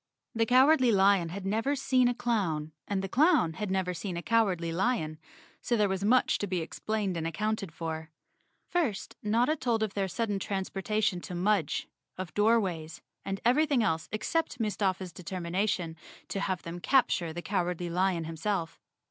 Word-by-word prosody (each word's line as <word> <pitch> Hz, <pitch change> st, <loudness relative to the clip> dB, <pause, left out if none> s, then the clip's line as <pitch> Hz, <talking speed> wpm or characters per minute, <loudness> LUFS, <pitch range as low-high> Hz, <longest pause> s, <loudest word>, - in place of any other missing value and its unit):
The 225 Hz, 0 st, +1 dB
Cowardly 260 Hz, +1 st, +5 dB
Lion 195 Hz, -4 st, +4 dB
had 190 Hz, +3 st, -6 dB
never 225 Hz, +8 st, 0 dB
seen 255 Hz, -2 st, +3 dB
a 245 Hz, -, +1 dB
clown 175 Hz, -12 st, -1 dB, 0.2 s
and 195 Hz, -1 st, -1 dB
the -, -, -2 dB
clown 275 Hz, -, +3 dB
had 210 Hz, +4 st, -4 dB
never 190 Hz, -1 st, 0 dB
seen 180 Hz, 0 st, -4 dB
a 170 Hz, -, -5 dB
Cowardly 195 Hz, -8 st, +1 dB
Lion, 170 Hz, -5 st, 0 dB, 0.4 s
so 240 Hz, -, 0 dB
there 210 Hz, -1 st, +3 dB
was 190 Hz, 0 st, -2 dB
much 250 Hz, +5 st, +3 dB
to 205 Hz, -, -2 dB
be 185 Hz, -1 st, -1 dB
explained 195 Hz, +3 st, -2 dB
and 165 Hz, 0 st, -2 dB
accounted 200 Hz, +2 st, -2 dB
for. 160 Hz, 0 st, -5 dB, 0.6 s
First, 280 Hz, -, -1 dB
Notta 235 Hz, +8 st, +2 dB
told 235 Hz, -6 st, 0 dB
of 210 Hz, -3 st, -2 dB
their 195 Hz, -1 st, 0 dB
sudden 205 Hz, +2 st, -2 dB
transportation 195 Hz, 0 st, -1 dB
to 180 Hz, -, -7 dB
Mudge, 185 Hz, -2 st, +1 dB, 0.3 s
of 185 Hz, -1 st, -6 dB
Door¬ 225 Hz, +3 st, +4 dB
ways, 165 Hz, -6 st, -4 dB, 0.2 s
and 195 Hz, 0 st, -3 dB
everything 280 Hz, 0 st, +3 dB
else 160 Hz, -6 st, -1 dB
except 255 Hz, +5 st, -1 dB
Mustafa's 195 Hz, -4 st, -1 dB
determina¬ 185 Hz, +2 st, -2 dB
tion 165 Hz, -4 st, -2 dB, 0.3 s
to 195 Hz, -, -2 dB
have 185 Hz, -2 st, -2 dB
them 170 Hz, +1 st, -6 dB
capture 180 Hz, -, +2 dB
the 175 Hz, +2 st, -6 dB
Cowardly 180 Hz, -3 st, -1 dB
Lion 180 Hz, -1 st, +1 dB
himself. 165 Hz, +1 st, -3 dB
195 Hz, 170 wpm, -29 LUFS, 175-225 Hz, 0.6 s, Cowardly